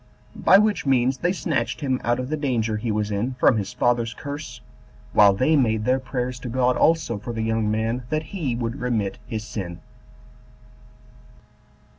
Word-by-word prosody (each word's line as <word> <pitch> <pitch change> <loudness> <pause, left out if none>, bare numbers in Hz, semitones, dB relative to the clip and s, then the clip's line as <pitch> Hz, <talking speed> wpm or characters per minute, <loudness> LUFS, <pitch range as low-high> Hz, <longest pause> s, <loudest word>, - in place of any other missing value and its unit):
By - - +8
which 210 -6 +1
means 130 0 +2
they 175 - +1
snatched 145 -9 -2
him 130 -3 -1
out 120 +1 +1
of 130 +1 -4
the 155 - 0
danger 120 -7 -1
he 110 +1 -2
was 105 0 -1
in 115 +6 -2
from 125 -2 +4
his 100 -1 -3
father's 120 -1 0
curse, 140 -3 -7 0.5
while 105 -2 +7
they 130 +11 +2
made 110 -6 +1
their 130 +1 +2
prayers 125 -1 -4
to 125 - -6
God 125 +1 +2
also 155 -10 +2
for 120 +3 -6
the 110 -1 -2
young 110 -1 0
man, 110 +3 -1
that 155 0 -1
he 150 -11 -2
would 120 +1 -3
remit 110 -6 -1
his 110 -1 -4
sin. 90 -6 -6
120 Hz, 175 wpm, -23 LUFS, 110-130 Hz, 0.5 s, By